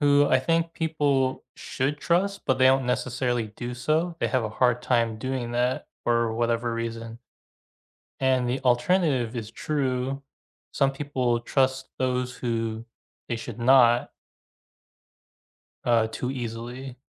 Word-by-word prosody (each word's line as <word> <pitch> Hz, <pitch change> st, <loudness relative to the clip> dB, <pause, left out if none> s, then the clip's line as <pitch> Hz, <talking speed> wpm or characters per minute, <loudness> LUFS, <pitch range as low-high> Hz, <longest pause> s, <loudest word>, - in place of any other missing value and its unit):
who 145 Hz, 0 st, +5 dB
I 130 Hz, -, +4 dB
think 165 Hz, +5 st, 0 dB
people 145 Hz, -5 st, 0 dB
should 140 Hz, +3 st, -2 dB
trust 195 Hz, +5 st, 0 dB
but 130 Hz, -, +2 dB
they 130 Hz, -, +6 dB
don't 130 Hz, -1 st, +4 dB
necessarily 125 Hz, -2 st, -1 dB
do 120 Hz, 0 st, -5 dB
so. 160 Hz, +7 st, 0 dB
They 115 Hz, -, +1 dB
have 125 Hz, 0 st, +1 dB
a 110 Hz, -, -1 dB
hard 125 Hz, +2 st, +1 dB
time 115 Hz, -3 st, +1 dB
doing 130 Hz, -1 st, -3 dB
that 125 Hz, +1 st, 0 dB, 0.2 s
for 115 Hz, -1 st, +2 dB
whatever 115 Hz, 0 st, 0 dB
reason. 115 Hz, 0 st, -5 dB, 1.0 s
And 130 Hz, -2 st, +2 dB
the 130 Hz, +2 st, -1 dB
alternative 130 Hz, -1 st, +2 dB
is 110 Hz, -2 st, -5 dB
true. 135 Hz, 0 st, -2 dB, 0.5 s
Some 135 Hz, -1 st, +2 dB
people 130 Hz, -4 st, -1 dB
trust 130 Hz, +1 st, 0 dB
those 125 Hz, -1 st, -1 dB
who 115 Hz, -2 st, -3 dB, 0.4 s
they 120 Hz, -, -1 dB
should 115 Hz, -, -7 dB
not 120 Hz, -1 st, +5 dB, 1.7 s
uh, 115 Hz, -2 st, +3 dB
too 125 Hz, +3 st, -3 dB
easily. 125 Hz, +1 st, -6 dB
125 Hz, 135 wpm, -26 LUFS, 120-135 Hz, 1.7 s, they